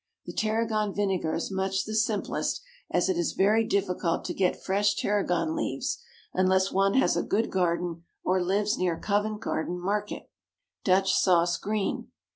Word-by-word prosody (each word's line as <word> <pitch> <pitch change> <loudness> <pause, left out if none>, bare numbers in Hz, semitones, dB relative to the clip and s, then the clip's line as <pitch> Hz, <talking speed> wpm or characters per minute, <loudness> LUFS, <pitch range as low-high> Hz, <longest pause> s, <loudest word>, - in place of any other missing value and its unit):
The - - -7
tarragon 215 -1 0
vinegar 190 -6 0
is 165 - -3
much 190 0 -1
the 215 - -5
simplest, 220 - 0 0.3
as - - +2
it 375 -2 +1
is 345 - 0
very 215 +4 +3
difficult 185 -5 0
to - - -2
get 185 -2 +1
fresh 205 +2 +1
tarragon 205 - 0
leaves 315 - -2 0.3
unless 190 +1 +2
one 195 +1 +2
has 265 - +3
a - - +1
good 220 +3 0
garden 175 -2 0 0.2
or 185 0 +2
lives 205 +4 +1
near 175 -3 +1
Covent 210 +1 0
Garden 180 -3 -2
Market. 205 +3 -3 0.5
DUTCH 190 0 +3
SAUCE 175 -2 +3
(GREEN). 210 +1 -2
195 Hz, 155 wpm, -27 LUFS, 185-210 Hz, 0.5 s, very